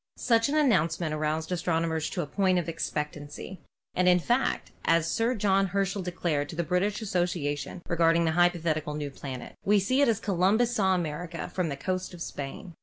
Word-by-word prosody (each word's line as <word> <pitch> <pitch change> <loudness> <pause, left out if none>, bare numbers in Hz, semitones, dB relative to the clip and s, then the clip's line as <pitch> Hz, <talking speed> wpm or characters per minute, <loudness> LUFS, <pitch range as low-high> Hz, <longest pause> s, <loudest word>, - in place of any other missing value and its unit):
Such 230 +1 +2
an 295 - 0
announcement 170 - +2
aroused 155 +2 -1
astronomers 165 -2 0
to 175 - -2
a - - -4
point 185 +3 +1
of 175 - -1
expectancy, 150 +2 -5 0.3
and 180 0 +2
in 180 - +6
fact, 240 +9 0
as 165 -1 +3
Sir 225 +8 +1
John 195 -2 +2
Herschel 195 +1 -1
declared 170 -5 -1
to - - -7
the 170 - 0
British 190 +6 0
Association 175 -4 -2
regarding 170 0 +3
the 160 - +2
hypothetical 165 -3 +1
new 145 -2 -4
planet, 130 -2 -7
"We 205 +1 +4
see 255 +8 +2
it 285 - +5
as 225 -3 +2
Columbus 210 +5 +2
saw 190 -4 +3
America 170 0 -4
from 180 -3 -1
the 140 - -4
coast 185 +3 -3
of 170 - -12
Spain." 145 +6 -7
175 Hz, 180 wpm, -28 LUFS, 160-195 Hz, 0.3 s, in